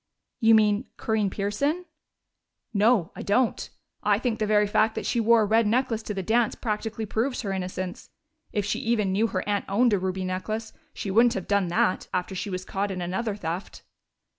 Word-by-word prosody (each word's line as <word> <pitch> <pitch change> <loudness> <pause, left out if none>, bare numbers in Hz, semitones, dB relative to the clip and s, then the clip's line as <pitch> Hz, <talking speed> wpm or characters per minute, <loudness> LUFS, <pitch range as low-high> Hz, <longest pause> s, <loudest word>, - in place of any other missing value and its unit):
"You 225 -1 +6
mean 210 +2 +3
Corinne 220 -3 0
Pearson?" 280 - -1 0.9
"No, 205 -3 +3
I - - -6
don't. 235 +4 +1 0.3
I - - +3
think 240 -4 -2
the 215 - 0
very 210 0 +4
fact 220 +2 +2
that - - -4
she 240 - 0
wore 230 0 +5
a - - +2
red 220 +1 +3
necklace 235 0 +1
to 210 -1 -5
the 190 - -3
dance 225 +3 +2
practically 220 0 -3
proves 230 +5 -1
her 195 -2 -2
innocence. 185 -1 -5 0.4
If 205 -3 -1
she 205 - -1
even 220 -4 +1
knew 210 +4 +2
her - - -3
aunt 205 -1 0
owned 230 +3 +3
a 200 - +3
ruby 190 0 -2
necklace, 215 +4 -3 0.2
she 195 - -4
wouldn't 230 +4 +4
have 190 - -4
done 200 -2 +2
that, 175 +2 +1
after 180 +1 -2
she 195 +3 -4
was 185 -1 -4
caught 200 +1 -2
in 190 -2 -4
another 190 +5 -2
theft." 175 -1 -5
210 Hz, 195 wpm, -26 LUFS, 190-225 Hz, 0.9 s, You